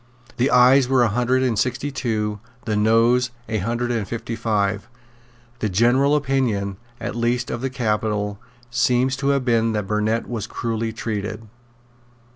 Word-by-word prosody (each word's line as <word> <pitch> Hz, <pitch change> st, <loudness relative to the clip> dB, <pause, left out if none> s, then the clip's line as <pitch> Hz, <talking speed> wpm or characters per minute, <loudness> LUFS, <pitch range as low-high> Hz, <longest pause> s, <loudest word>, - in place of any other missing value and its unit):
The 130 Hz, +2 st, +2 dB
Ayes 125 Hz, +1 st, +6 dB
were 130 Hz, -2 st, +4 dB
a 120 Hz, -, +3 dB
hundred 125 Hz, +4 st, +1 dB
and 115 Hz, -5 st, +1 dB
sixty 125 Hz, +4 st, -1 dB
two; 110 Hz, -5 st, -2 dB, 0.3 s
the 110 Hz, -2 st, -1 dB
Noes 115 Hz, +4 st, +3 dB, 0.2 s
a 110 Hz, -1 st, -1 dB
hundred 120 Hz, +5 st, -1 dB
and 110 Hz, -4 st, -1 dB
fifty 115 Hz, 0 st, -4 dB
five. 105 Hz, -2 st, -1 dB, 0.7 s
The 110 Hz, -, -1 dB
general 120 Hz, +9 st, +3 dB
opinion, 125 Hz, -9 st, 0 dB, 0.2 s
at -, -, -4 dB
least 120 Hz, +1 st, 0 dB
of 120 Hz, -, -3 dB
the 135 Hz, -, -1 dB
capital, 105 Hz, -4 st, -1 dB, 0.3 s
seems 125 Hz, +2 st, +2 dB
to 140 Hz, 0 st, -2 dB
have 140 Hz, -2 st, +1 dB
been 115 Hz, -2 st, +2 dB
that 105 Hz, -2 st, -1 dB
Burnet 105 Hz, +3 st, 0 dB
was 115 Hz, -3 st, -4 dB
cruelly 115 Hz, -1 st, -3 dB
treated. 110 Hz, 0 st, -4 dB
115 Hz, 155 wpm, -22 LUFS, 105-125 Hz, 0.7 s, Ayes